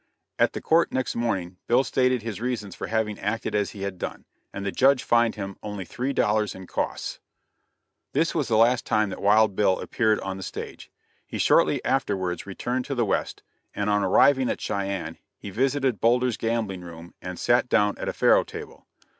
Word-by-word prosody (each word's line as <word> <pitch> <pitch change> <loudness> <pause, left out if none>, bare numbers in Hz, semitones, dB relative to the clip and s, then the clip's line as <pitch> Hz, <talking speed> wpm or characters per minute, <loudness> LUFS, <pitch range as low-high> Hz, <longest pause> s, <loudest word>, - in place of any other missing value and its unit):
At - - +3
the - - -5
court 165 +1 +3
next 130 -1 -2
morning 95 -7 -2
Bill 125 +3 +4
stated 130 -3 +1
his 115 -2 -5
reasons 120 -6 -3
for - - -6
having 110 -2 -1
acted 105 +2 -2
as 105 -1 +1
he 100 -2 -8
had 100 -2 -4
done, - - -6 0.3
and 100 0 -6
the 100 - -1
judge 130 +7 +3
fined 120 -1 +3
him 100 -2 -6
only 105 -3 -5
three 125 +9 -3
dollars 105 -4 +1
and 95 -1 -10
costs. - - -3 0.9
This 165 - +1
was 150 -5 0
the 110 - +2
last 120 +3 +4
time 110 -1 +1
that - - -7
Wild 105 0 +4
Bill 95 -2 +2
appeared 110 -3 +1
on 95 0 -4
the - - -8
stage. 95 - -7 0.4
He - - -5
shortly - - +3
afterwards 95 -10 -1
returned 125 +6 -3
to 140 - -3
the 120 -2 +1
West, - - -2 0.3
and 100 0 0
on 105 0 +2
arriving 130 +7 +4
at - - -2
Cheyenne, 95 -5 -3 0.2
he 100 - -8
visited 130 +1 0
Boulder's 125 +1 +3
gambling 115 -5 -2
room 85 0 -11
and 90 -1 -6
sat 120 +1 +2
down 105 0 +3
at - - -2
a - - -3
faro - - +4
table. - - -10
110 Hz, 195 wpm, -25 LUFS, 100-125 Hz, 0.9 s, Bill